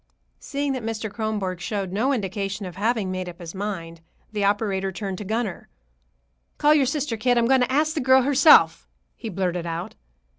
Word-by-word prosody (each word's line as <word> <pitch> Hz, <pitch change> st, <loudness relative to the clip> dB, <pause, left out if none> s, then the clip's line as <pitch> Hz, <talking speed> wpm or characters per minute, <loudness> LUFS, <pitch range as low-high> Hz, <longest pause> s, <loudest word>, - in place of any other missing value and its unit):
Seeing 285 Hz, -1 st, -2 dB
that 260 Hz, -, -3 dB
Mr. 220 Hz, -1 st, -4 dB
Kronborg 210 Hz, -5 st, -2 dB
showed 195 Hz, -1 st, -3 dB
no 225 Hz, +8 st, +1 dB
indication 200 Hz, -3 st, -3 dB
of 180 Hz, -2 st, -8 dB
having 210 Hz, -1 st, 0 dB
made 185 Hz, -1 st, -4 dB
up 170 Hz, -, -11 dB
his 170 Hz, -2 st, -8 dB
mind, 180 Hz, -5 st, -5 dB, 0.3 s
the 210 Hz, -2 st, -2 dB
operator 200 Hz, -1 st, 0 dB
turned 190 Hz, -1 st, -5 dB
to -, -, -5 dB
Gunner. 225 Hz, +4 st, -3 dB, 0.9 s
"Call 300 Hz, 0 st, +5 dB
your 285 Hz, -4 st, +3 dB
sister, 280 Hz, -3 st, -1 dB
kid. 245 Hz, +2 st, +2 dB
I'm 235 Hz, -, +3 dB
going 260 Hz, +1 st, +4 dB
to 250 Hz, -, +1 dB
ask 305 Hz, +3 st, +2 dB
the 310 Hz, -, -2 dB
girl 260 Hz, 0 st, +5 dB
herself," 285 Hz, +3 st, +5 dB, 0.3 s
he 230 Hz, -, -7 dB
blurted 180 Hz, -3 st, -2 dB
out. 165 Hz, +1 st, -4 dB
210 Hz, 185 wpm, -24 LUFS, 190-255 Hz, 0.9 s, Call